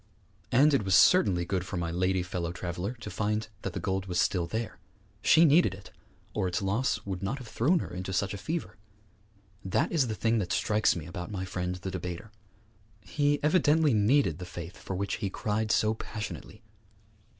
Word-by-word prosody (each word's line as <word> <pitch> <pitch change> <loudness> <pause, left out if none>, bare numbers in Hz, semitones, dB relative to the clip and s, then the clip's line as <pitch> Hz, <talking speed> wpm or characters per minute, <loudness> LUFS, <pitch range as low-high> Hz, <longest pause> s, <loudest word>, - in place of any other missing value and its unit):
And 145 +4 +5
it 135 - +3
was 95 -2 +3
certainly 95 - +5
good 90 0 -1
for 95 - -5
my 85 -1 -2
lady 90 +1 +1
fellow 90 -1 -3
traveller 90 +4 -4
to 105 - -6
find 105 +1 -1
that - - -4
the - - -3
gold 95 0 -2
was 90 -1 -1
still 90 -4 +1
there. 110 +5 -4 0.4
She 160 +11 +6
needed 155 - +4
it, 95 0 -14 0.4
or 95 - 0
its 90 - -1
loss 105 +2 -1
would 95 -2 -4
not 100 +8 -2
have 130 -4 -10
thrown 145 +12 +2
her - - -7
into 90 +1 -5
such 95 +2 0
a 100 - -6
fever. 150 - -4 0.9
That 95 - 0
is 150 -7 +2
the 110 - -3
thing 115 +1 +1
that 90 -4 -3
strikes 105 0 +2
me 85 -4 -5
about 90 +1 -6
my 95 -3 -4
friend 90 0 -3
the 95 +1 -6
debater. 90 +3 -6 0.7
He 145 +10 +1
evidently 155 -2 +4
needed 105 - +3
the 90 - -6
faith 85 0 -8
for 95 - -6
which 100 +1 -2
he 105 -3 -2
cried 105 +2 -1
so 110 0 +3
passionately. 105 - -7
100 Hz, 195 wpm, -29 LUFS, 90-115 Hz, 0.9 s, She